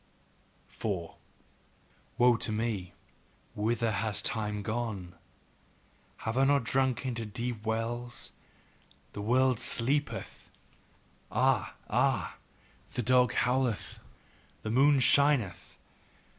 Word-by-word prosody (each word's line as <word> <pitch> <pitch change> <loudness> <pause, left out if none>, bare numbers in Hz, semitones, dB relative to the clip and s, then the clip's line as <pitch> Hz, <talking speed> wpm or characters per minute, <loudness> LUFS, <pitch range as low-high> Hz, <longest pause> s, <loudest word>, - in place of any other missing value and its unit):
4. 95 -7 -4 1.0
Woe 120 0 +6
to 115 - -2
me! 105 -4 -2 0.6
Whither 115 +2 0
hath 105 0 -1
time 105 -2 -1
gone? 110 -6 -3 1.1
Have 115 +3 0
I - - +5
not 140 -4 +2
sunk 130 0 +1
into 120 -3 -2
deep 115 +1 -4
wells? 115 +2 -3 0.8
The 105 - -5
world 125 +2 +3
sleepeth 140 +5 -1 0.8
Ah! - - +1
Ah! - - +1 0.6
The 125 - -1
dog 125 0 +4
howleth, 125 -2 0 0.6
the 110 - -2
moon 140 +3 +5
shineth. 130 - +3
115 Hz, 95 wpm, -30 LUFS, 110-125 Hz, 1.1 s, Woe